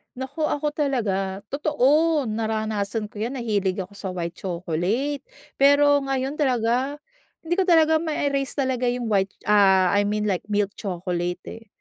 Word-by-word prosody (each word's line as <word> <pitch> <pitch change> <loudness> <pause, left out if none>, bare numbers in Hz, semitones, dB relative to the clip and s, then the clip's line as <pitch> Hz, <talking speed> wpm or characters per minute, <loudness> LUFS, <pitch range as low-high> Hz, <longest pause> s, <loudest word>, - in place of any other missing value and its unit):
Naku 275 +4 -3
ako 295 0 -1
talaga, 205 -10 -1
totoo 300 +1 +2
naranasan 215 -1 -2
ko 210 - -10
yan 240 +5 -2
nahilig 200 -6 -1
ako 195 +3 -15
sa 190 - -5
white 170 -1 -4
chocolate. 185 - -2 0.4
Pero 285 +1 +5
ngayon 270 +2 -2
talaga 255 +1 +1 0.5
hindi 330 +2 -1
ko - - +4
talaga 320 -2 +5
ma-erase 280 -4 -1
talaga 260 -3 0
yung 245 -1 -1
white 195 -1 +2 0.2
ah 190 -3 +5
I 205 - +3
mean 210 0 -1
like 185 - -2
milk 205 -1 0
chocolate 180 -2 -3
eh. 225 -1 -9
230 Hz, 145 wpm, -24 LUFS, 195-280 Hz, 0.5 s, Pero